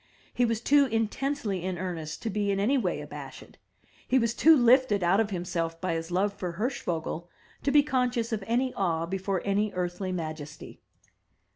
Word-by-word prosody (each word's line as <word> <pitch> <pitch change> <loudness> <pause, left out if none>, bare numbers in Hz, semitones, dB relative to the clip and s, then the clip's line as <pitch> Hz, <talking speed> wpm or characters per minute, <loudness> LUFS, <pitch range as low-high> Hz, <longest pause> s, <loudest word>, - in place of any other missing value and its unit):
He 245 - +2
was 230 -1 -1
too 285 +2 +4
intensely 225 -2 -1
in 185 -1 -2
earnest 165 -3 -5
to 225 - -2
be 205 0 -1
in 195 -1 +1
any 225 +8 +2
way 260 - 0
abashed; - - -10 0.5
he 260 - +3
was 230 -2 +2
too 315 +5 +6
lifted 245 -5 +4
out 180 +4 +4
of 220 -2 +1
himself 170 -3 -3
by 185 -1 -1
his 165 0 -3
love 195 +3 +1
for 180 -3 -5
Hirschvogel 175 - -3 0.3
to 280 - 0
be 290 +1 +6
conscious 250 -5 0
of 210 -2 -2
any 250 +3 +1
awe 165 -4 0
before 190 +1 -2
any 205 +1 +1
earthly 180 +1 -2
majesty. 155 -4 -6
200 Hz, 175 wpm, -28 LUFS, 175-240 Hz, 0.5 s, too